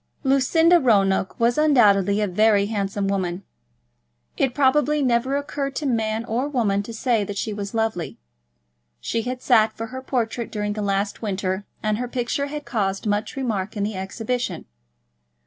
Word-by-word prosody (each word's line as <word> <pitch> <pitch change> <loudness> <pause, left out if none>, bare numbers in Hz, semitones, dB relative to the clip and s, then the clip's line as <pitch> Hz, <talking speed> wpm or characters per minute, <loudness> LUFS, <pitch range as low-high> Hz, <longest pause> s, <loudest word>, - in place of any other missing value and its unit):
Lucinda 320 +6 +4
Roanoke 195 - +2
was 240 +3 +2
undoubtedly 210 -9 +4
a 210 - +1
very 205 +2 +3
handsome 200 -1 -2
woman. 190 -1 -2 0.9
It 260 -2 0
probably 295 +1 +3
never 255 +2 +1
occurred 280 -1 -4
to 300 - -3
man 225 -3 0
or 245 +5 -1
woman 215 -8 +1
to 205 - -8
say 230 -1 0
that 200 0 -6
she 215 - -2
was 200 +1 -5
lovely. 220 -6 -2 0.8
She 230 - -2
had 250 +2 -5
sat 225 -4 +4
for 225 - -3
her 260 - -5
portrait 240 -3 -2
during 210 -1 -2
the 210 - -4
last 200 0 -1
winter, 195 -2 -2 0.2
and 215 0 0
her 250 - -2
picture 255 +3 -2
had 295 0 -6
caused 195 -4 -2
much 205 +4 -1
remark 220 -6 -3
in 205 - -1
the 210 0 -2
Exhibition. 200 0 -3
220 Hz, 165 wpm, -23 LUFS, 200-255 Hz, 0.9 s, Lucinda